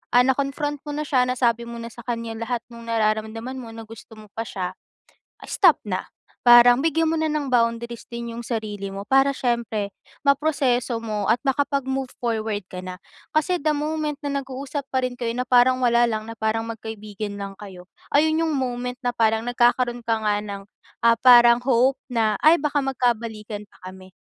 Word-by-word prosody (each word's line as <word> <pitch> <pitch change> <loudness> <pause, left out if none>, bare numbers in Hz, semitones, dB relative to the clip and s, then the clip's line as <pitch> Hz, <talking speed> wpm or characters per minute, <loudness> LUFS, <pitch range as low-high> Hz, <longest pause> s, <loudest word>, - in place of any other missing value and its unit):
ah, 245 - +7
na-confront 280 +2 -1
mo 295 - -4
na 300 - -2
siya, 255 -4 +2
nasabi 235 -2 0
mo 235 - -7
na 230 0 -7
sa 235 - -12
kanya 230 -1 -4
lahat 235 +1 -3
ng 235 0 -11
nararamdaman 225 +3 -1
mo 230 -3 -9
na 225 - -8
gusto 225 0 -13
mo 215 -1 -15
pa 225 +2 -5
si'ya, 180 -2 -4 0.8
stop 355 -6 +4
na. 185 -2 -2 0.4
Parang 240 +1 +8
bigyan 325 +2 +1
mo 325 - 0
na 315 - +1
ng 300 -3 -2
boundaries 235 -1 0
din 235 0 -6
'yung 230 - -7
sarili 215 -4 -4
mo 195 0 -6
para 270 +4 +3
siyempre 235 -5 -1 0.3
ma-proseso 280 -4 +1
mo 210 -3 -2
at 230 +5 +2
makapag-move 270 -1 0 0.2
forward 220 -3 -1
ka 180 - -6
na. 185 0 -7 0.4
Kasi 345 +4 +2
the 305 +1 +1
moment 300 0 -2
na 280 -1 -1
nag-uusap 270 +1 -6
pa 260 -1 -1
rin 250 -1 -3
kayo 235 -1 -2
na 250 - -1
parang 255 0 +4
wala 240 0 +4
lang, 215 -2 -2
na 225 +1 -10
parang 220 +1 0
magkaibigan 215 -2 -6
lang 200 -1 -6
kayo, 190 -3 -10 0.3
ayun 315 +2 +3
'yung 325 -2 0
moment 250 -2 -2
na 245 - +1
parang 225 -1 +1
nagkakaroon 245 0 +2
ka 225 -2 -1
nga 210 -1 +1
ng, 200 -1 -7 0.4
ah, 230 -1 +4
parang 240 -1 +7
hope 260 +1 +3
na, 225 -5 0
"Ay, 315 +2 +6
baka 295 -2 0
mag 270 -1 -2
kabalikan 220 -4 -2
pa 185 -2 -12
kami." 185 0 -15
240 Hz, 190 wpm, -23 LUFS, 220-265 Hz, 0.8 s, Parang